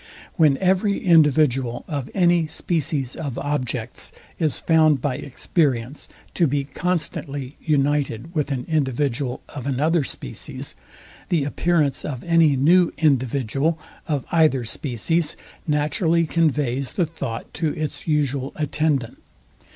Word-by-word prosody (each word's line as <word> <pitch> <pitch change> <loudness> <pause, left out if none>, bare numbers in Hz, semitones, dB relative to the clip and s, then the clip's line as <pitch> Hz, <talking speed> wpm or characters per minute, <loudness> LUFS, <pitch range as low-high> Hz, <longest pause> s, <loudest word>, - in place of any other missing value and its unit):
When 155 -6 +4
every 190 +3 +2
individual 145 -7 +3
of 140 -5 -4
any 175 -3 +3
species 150 -4 -1
of 140 -5 -5
objects 145 -4 -3 0.3
is 155 -3 0
found 155 -3 +4
by 135 +1 -1
experience 130 -1 -1 0.3
to 170 - +3
be 140 0 0
constantly 145 -3 -3
united 145 -1 0
with 150 -3 -1
an 125 -2 -2
individual 135 -4 -1
of 140 -2 -7
another 150 +4 +2
species, - - -4 0.6
the 165 -5 +2
appearance 150 0 +1
of 130 -5 -5
any 165 -4 +4
new 170 +6 +4
individual 140 +1 +1 0.3
of 145 -4 -1
either 155 -6 +3
species 150 +7 0 0.3
naturally 160 +3 +2
conveys 145 -5 0
the 180 - +1
thought 140 -8 -6
to 160 -2 -1
its 155 +1 -4
usual 140 -3 0
attendant. 150 -4 -1
150 Hz, 120 wpm, -22 LUFS, 135-160 Hz, 0.6 s, When